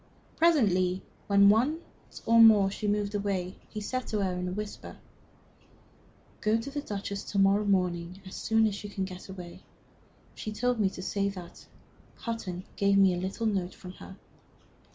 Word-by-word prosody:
Presently, 190 - +3 0.2
when 200 0 +6
once 255 +10 +3 0.5
more 220 -4 +7
she 210 +1 -4
moved 205 0 0
away, 195 -3 -2
he 215 - -6
said 255 +4 -3
to 210 -2 -1
her, 185 -1 0
in 180 0 -3
a - - -3
whisper: 210 +2 -6 1.4
"Go 215 +2 +2
to 250 +5 -6
the 290 +1 -3
Duchess 200 -5 -5
to 200 - -4
morrow 195 +2 +4
morning, 180 -2 0
as 190 - -10
soon 225 0 +2
as 205 -1 -2
you 205 - -6
can 195 -1 -3
get 185 0 -9
away. 180 -2 -9 0.7
She 215 - -6
told 245 +2 0
me 200 -2 +3
to 185 - -8
say 200 +1 0
that 180 -3 -10 0.5
Hutton 190 -6 -5
gave 200 0 +3
me 195 -2 +5
a - - -2
little 195 +5 -3
note 190 -4 -1
from 180 - -10
her. 190 - -10
200 Hz, 170 wpm, -29 LUFS, 185-215 Hz, 1.4 s, more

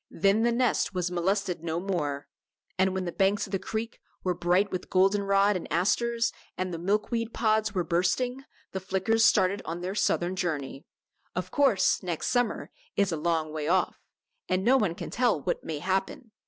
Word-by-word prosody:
Then 200 +2 +2
the 235 +1 +3
nest 235 -4 +1
was 180 -1 -1
molested 180 0 -1
no 165 0 -2
more. 150 -7 -2 0.5
And 190 0 +1
when 190 -1 -2
the 175 - -3
banks 195 +3 +1
of 195 - -13
the 195 - 0
creek 220 +3 -4 0.2
were 180 - +1
bright 180 +3 +1
with 185 - -4
golden 195 +2 +3
rod 200 +1 +3
and 180 - -5
asters, 230 +8 +1 0.2
and 185 -1 -2
the 165 - -4
milkweed 215 +5 -1
pods 215 -2 +1
were 180 - +1
bursting, 185 - 0 0.3
the 190 - -3
Flickers 195 +4 +1
started 195 -1 +4
on 170 +2 -5
their 185 +2 -3
southern 180 -3 +1
journey. 150 -7 -3 0.5
Of - - -3
course 265 -10 +3
the 185 - -12
next 170 -3 -2
summer 245 -3 0 0.2
is 200 -2 +2
a - - 0
long 160 -1 -1
way 155 -1 -3
off, 180 +1 +1 0.5
and 185 +1 +1
no 255 +3 +5
one 210 -10 +1
can - - -7
tell 240 -8 +2
what - - -2
may 160 -2 -4
happen. 190 - -2
190 Hz, 190 wpm, -28 LUFS, 175-215 Hz, 0.5 s, no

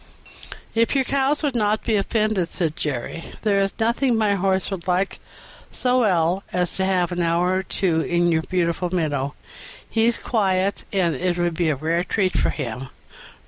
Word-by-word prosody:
"If 230 +4 +2
your 270 - +3
cows 275 +3 +1
would 290 -3 +1
not 215 -2 +1
be 225 - +1
offended," 210 -3 0
said 160 -4 -1
Jerry, 145 +3 -3 0.2
"there 205 -2 +3
is 195 0 +1
nothing 235 +2 +2
my 215 -2 +2
horse 190 0 0
would 185 -2 -5
like 185 +2 0 0.5
so 250 0 +1
well 180 -4 +2
as 180 -1 0
to 190 - +1
have 180 -2 +1
an 175 0 -1
hour 170 +2 +2
or - - 0
two 175 -4 0
in 175 +1 +1
your 160 -1 +2
beautiful 175 0 -1
meadow; 145 -6 -1 0.5
he's 230 +1 +2
quiet, 195 -3 0
and 180 -5 +1
it 180 -1 -1
would 175 -1 0
be 165 0 0
a 150 - +1
rare 165 +5 0
treat 190 -1 0
for - - +2
him." 130 -1 -4
185 Hz, 180 wpm, -22 LUFS, 170-215 Hz, 0.5 s, your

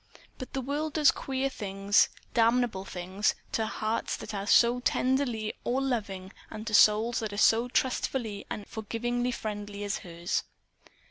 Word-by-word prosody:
But 255 - -8
the 270 - -1
world 290 +4 -2
does 300 -2 +5
queer 270 0 -2
things 200 -4 +2 0.2
damnable 230 -4 +2
things 185 +3 -1 0.2
to 220 -1 0
hearts 220 +1 -2
that - - -8
are 200 0 -4
so 240 +2 +5
tenderly 250 -4 0
all 250 +2 0
loving 205 -8 -3 0.2
and 215 - -7
to 220 - -4
souls 215 +3 +5
that 220 -2 -3
are - - -5
so 225 +3 +4
trustfully 245 -4 -1
and 205 - -5
forgivingly 240 +3 -2
friendly 205 -3 -5
as 205 -1 -2
hers. 170 -2 -2
225 Hz, 150 wpm, -29 LUFS, 205-250 Hz, 0.2 s, does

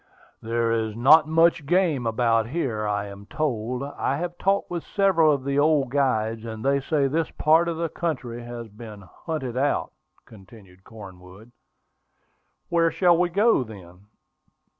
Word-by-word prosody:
"There 115 0 -1
is 110 -2 -1
not 150 +6 +6
much 165 -2 +2
game 165 -8 +1
about 115 -1 +1
here, 120 -7 -2
I 105 0 -1
am 100 0 -11
told. 125 -3 -3
I 140 -1 -3
have 175 +2 -4
talked 195 -1 0
with 175 -2 -4
several 190 -6 +2
of 140 -3 -1
the 140 +1 0
old 145 -4 +2
guides, 115 -5 0
and 110 0 -7
they 140 0 +2
say 145 -1 0
this 160 +3 -1
part 160 +3 +2
of 170 -1 -3
the 165 0 -1
country 135 -8 -4
has 120 -1 -8
been 105 -1 -11
hunted 130 - -6
out," 140 +2 -1 0.3
continued 95 -3 -17
Cornwood. 95 0 -13 1.2
"Where 165 -1 +2
shall 175 0 +3
we 175 +1 +1
go, 205 - +3
then?" 95 -3 -14
130 Hz, 155 wpm, -24 LUFS, 110-160 Hz, 1.2 s, not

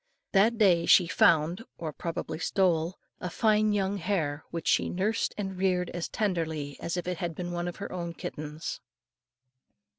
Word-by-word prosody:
That 215 +4 +4
day 180 -6 +4
she 180 - +7
found, 165 +1 +3 0.2
or 165 - -4
more - - -8
probably 165 -1 -4
stole, 175 -2 +1 0.2
a 180 - -4
fine 215 +2 +3
young 200 -1 0
hare, 160 -6 -1
which 165 -1 -5
she - - +3
nursed 200 +5 0
and 195 -2 -3
reared 180 -2 +1
as 175 -1 -4
tenderly 160 -8 -2
as 170 +1 -3
if 175 - -3
it 180 -1 -2
had 170 -2 -3
been 175 +1 -4
one 175 0 -2
of 175 - -4
her 200 - -6
own 170 -2 -4
kittens. 150 +1 -6
175 Hz, 175 wpm, -29 LUFS, 165-195 Hz, 0.2 s, she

